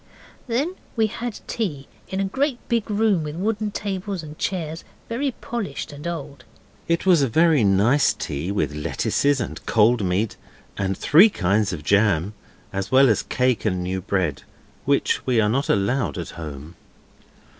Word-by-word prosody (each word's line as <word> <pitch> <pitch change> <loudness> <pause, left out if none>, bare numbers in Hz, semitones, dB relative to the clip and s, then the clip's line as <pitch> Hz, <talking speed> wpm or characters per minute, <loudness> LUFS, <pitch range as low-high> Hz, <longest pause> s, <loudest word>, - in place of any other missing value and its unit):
Then 270 +9 0 0.2
we 225 -2 +3
had 230 +1 -5
tea 150 -12 -3 0.2
in 190 - -3
a - - +1
great 270 +6 0
big 230 -3 0
room 210 -4 +2
with 150 0 -5
wooden 210 +3 -1
chairs 195 -3 -4
and 155 0 -10
tables, 165 -3 -3 0.2
very 260 +5 -1
polished 205 - -4
and 145 +3 -7
old. 145 -5 -6 0.4
It 170 +2 0
was 180 -5 +5
a 135 - +3
very 155 +1 +4
nice 105 +9 +4
tea, 75 +7 -4
with 75 -8 -1
lettuces, 135 - 0
and - - -5
cold 115 0 +4
meat, 95 +4 0 0.4
and 95 -1 -2
three 180 +9 +6
kinds 100 - +1
of 80 -4 -6
jam, 100 0 +2 0.4
as 95 0 -3
well 135 0 +6
as 110 - +2
cake, 125 -2 0
and 90 -4 0
new 95 +1 -2
bread, 90 -6 -1 0.4
which - - +1
we 125 -3 +3
are 105 - +3
not 135 +5 0
allowed 105 +4 +1
at 85 - -5
home. 75 0 -8
135 Hz, 165 wpm, -23 LUFS, -, 0.4 s, three